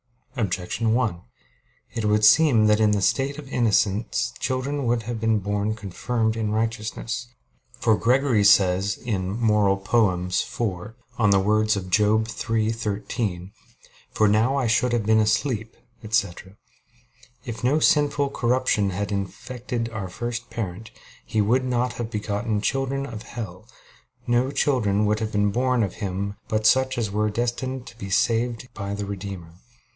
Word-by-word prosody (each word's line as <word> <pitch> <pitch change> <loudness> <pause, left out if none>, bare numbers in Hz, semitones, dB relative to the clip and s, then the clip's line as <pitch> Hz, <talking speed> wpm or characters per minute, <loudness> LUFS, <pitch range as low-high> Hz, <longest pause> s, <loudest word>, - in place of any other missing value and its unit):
Objection 110 0 -1
1: 110 -9 0 0.7
It 115 - -2
would 105 0 +3
seem 120 -1 +6
that 105 0 +4
in 110 -1 +4
the 105 -1 +1
state 135 +6 +1
of 150 -2 -9
innocence 110 0 +1
children 130 +1 -2
would 115 -1 +1
have 115 +1 -4
been 110 0 +2
born 105 +1 -1
confirmed 110 +2 -2
in 110 -2 -2
righteousness. 115 +2 -3 0.5
For 110 - +2
Gregory 125 -1 +2
says 95 0 +4
(Moral. 105 -1 +1
iv) 95 +1 -1 0.2
on 110 -3 +4
the 100 -1 +5
words 110 +2 +2
of 95 -2 -5
Job 105 +2 +3
3:13: 110 -4 -2 0.6
"For 110 - +2
now 110 +6 +3
I 135 -2 0
should 120 +2 +2
have 115 -3 0
been 110 0 +4
asleep, 110 +1 0 0.3
etc.": 100 -3 -2 0.9
"If 115 -2 -6
no 140 +5 +3
sinful 145 -2 +3
corruption 120 -6 +1
had 100 +2 -3
infected 115 +4 -4
our 105 -5 -5
first 120 +4 -5
parent, 110 0 -5 0.3
he 110 - 0
would 125 +5 +2
not 125 -1 0
have 120 -1 -5
begotten 105 0 -2
'children 135 +3 -1
of 115 -5 -7
hell'; 105 -3 -8 0.6
no 120 +2 +2
children 110 -8 +1
would 105 +1 +1
have 110 -1 -3
been 105 0 +2
born 125 +1 +1
of 95 - -3
him 100 +1 -4
but 110 0 -1
such 130 +3 +3
as 110 -4 -1
were 105 +1 0
destined 120 +3 -3
to 115 - -13
be 100 - -6
saved 115 +4 0
by 100 -1 -4
the 100 0 -4
Redeemer." 95 -4 -7
110 Hz, 150 wpm, -24 LUFS, 100-120 Hz, 0.9 s, seem